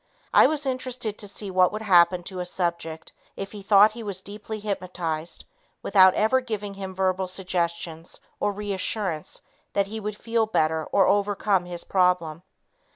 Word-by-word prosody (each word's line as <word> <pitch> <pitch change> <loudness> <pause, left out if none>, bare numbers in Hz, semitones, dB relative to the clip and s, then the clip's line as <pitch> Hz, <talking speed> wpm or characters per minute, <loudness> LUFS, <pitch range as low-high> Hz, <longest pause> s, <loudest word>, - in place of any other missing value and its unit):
I - - +7
was 300 -2 -2
interested 255 -4 -3
to 205 - -2
see 200 0 -4
what 185 -1 +4
would 215 +1 -5
happen 175 -2 +4
to 185 +1 -7
a 180 - -2
subject 170 -3 -3 0.2
if 195 0 -6
he 210 - -8
thought 205 +1 +6
he 230 +2 -9
was 200 -4 -4
deeply 210 +2 -7
hypnotized 180 -5 -4 0.4
without 190 -2 +6
ever 220 +5 +3
giving 210 -5 -5
him 190 -1 -7
verbal 190 0 0
suggestions 170 -3 -3 0.2
or 205 - +1
reassurance 200 -4 -3 0.3
that 200 - +2
he 220 +3 -6
would 210 0 -5
feel 230 -1 0
better 160 -6 +1
or 195 - +3
overcome 200 -2 +1
his 175 -1 -7
problem. 180 -4 +1
195 Hz, 160 wpm, -25 LUFS, 180-210 Hz, 0.4 s, I